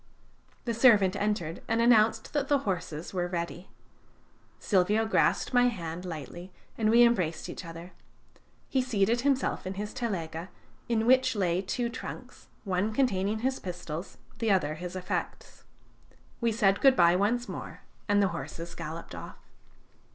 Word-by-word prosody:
The 235 - -1
servant 215 -6 +5
entered 205 -6 -2
and 225 +1 +1
announced 230 -2 +3
that 285 -2 0
the 285 - +4
horses 175 -4 -3
were 175 -1 -1
ready. 175 +1 -5 0.9
Silvio 205 +3 +2
grasped 220 - +1
my 245 0 +5
hand 170 -7 -4
tightly, 175 +4 -8 0.2
and 215 -1 +1
we 235 +2 +7
embraced 185 -9 +1
each - - -7
other. 170 +1 -9 0.8
He 265 - +1
seated 235 -1 +1
himself 270 -7 0
in 190 - -4
his 210 +2 -5
telega, 175 -6 -4 0.4
in 225 -1 +1
which 255 0 +4
lay 180 -3 +1
two 235 +5 -2
trunks, 235 - -8 0.2
one 195 +1 0
containing 215 -4 +1
his 260 +2 0
pistols, 175 -2 -6 0.2
the 225 - 0
other 180 -7 +2
his 175 +3 -7
effects. 185 -1 -5 0.7
We 235 -1 +1
said 200 -3 +2
good 270 -1 +6
bye 170 -3 +5
once 230 +6 +1
more, - - -7 0.3
and 205 0 +4
the 195 - +2
horses 170 0 -6
galloped 165 0 -7
off. - - -9
200 Hz, 150 wpm, -29 LUFS, 175-235 Hz, 0.9 s, we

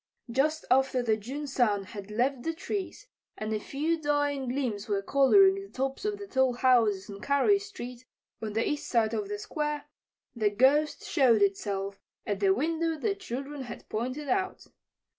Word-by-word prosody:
Just 305 +5 +1
after 265 -1 +3
the 220 -2 +2
June 260 +8 -6
sun 240 -7 +1
had 200 +1 -9
left 245 +4 0
the 325 +5 -2
trees 395 +7 -4 0.3
and 215 0 -3
a 215 - 0
few 310 +8 -2
dying 290 -2 0
gleams 240 -5 -2
were 200 -1 0
coloring 385 - +6
the 395 - -11
tops 270 +7 -3
of 420 -1 -1
the 405 - -7
tall 265 -8 +2
houses 235 -6 +3
on 200 -1 -9
Carey 280 - +3
street, 255 - -8 0.4
on 215 -2 -4
the 225 +2 +1
east 295 - -2
side 230 -2 +2
of 210 -3 -2
the 205 - -3
Square, 295 +6 -3 0.5
the 215 -3 +2
Ghost 270 +8 +3
showed 235 -6 +4
itself 195 0 -1 0.3
at 205 -2 -2
the 195 -1 +4
window 325 +7 0
the 400 +7 0
children 285 -7 -6
had 240 -2 -8
pointed 255 +6 -3
out. 380 +4 -1
260 Hz, 175 wpm, -29 LUFS, 215-300 Hz, 0.5 s, coloring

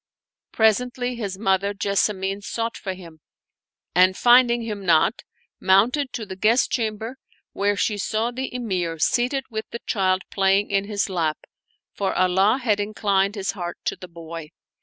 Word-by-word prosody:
Presently 245 +3 +1
his 200 -5 -4
mother 195 0 +1
Jessamine 195 0 0
sought 230 +2 -3
for 190 -2 -5
him 165 -4 -13 0.7
and 185 +1 +4
finding 240 -1 +5
him 210 -3 -5
not, 170 +5 +3 0.4
mounted 235 +9 +3
to 225 - -4
the 190 - -7
guest 220 +6 +2
chamber, 225 +1 -2 0.4
where 205 +1 +1
she 205 +1 -1
saw 220 +4 -1
the 260 +2 -4
Emir 185 -9 -2
seated 250 - +1
with 220 0 -4
the 235 - -7
child 190 -2 +1
playing 195 +1 +2
in 195 0 +1
his 205 -1 -1
lap, 165 -5 -1 0.6
for 195 -1 -2
Allah 190 +5 +3
had 220 -6 0
in 205 +1 -3
clined 200 0 +1
his 195 -2 -2
heart 175 -3 -6
to - - -1
the 185 - -11
boy. 165 -2 -8
200 Hz, 160 wpm, -23 LUFS, 190-230 Hz, 0.7 s, finding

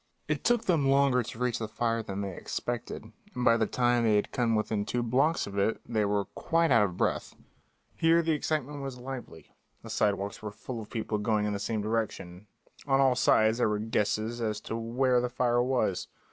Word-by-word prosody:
It - - -1
took 240 -1 +2
them 160 -7 +2
longer 135 -2 +4
to 115 - -7
reach 125 -1 -1
the 110 - -3
fire 115 +1 -1
than 100 -2 -5
they 95 -2 -4
expected, 120 -1 -5 0.2
and 125 0 -2
by 115 - +6
the 110 -2 +1
time 120 0 +2
they 110 -2 +3
had 105 - 0
come 115 -2 +1
within 105 -1 0
two 120 +3 -2
blocks 135 +8 +2
of 100 0 -4
it 105 +3 +1
they 110 -3 +1
were 100 -1 0
quite 165 -1 0
out 115 -3 +6
of 90 -3 -5
breath. - - -1 0.6
Here 165 +1 +4
the 165 - +1
excitement 150 -2 -2
was 135 -2 -5
lively; 125 - -8 0.3
the - - -8
sidewalks 100 +1 0
were 105 - -4
full 110 +3 -7
of 105 - -11
people 110 -2 -2
going 105 0 +1
in 105 - -1
the 100 - -3
same 110 0 -2
direction; 105 -4 -3 0.4
on 135 -1 +3
all 135 -2 +5
sides 110 -1 +3
there 115 - +3
were 105 - 0
guesses 110 +2 -1
as 105 -2 -1
to - - -5
where 120 +2 +1
the 125 - -1
fire 120 -1 +1
was. 120 -7 0
115 Hz, 210 wpm, -29 LUFS, 105-125 Hz, 0.6 s, by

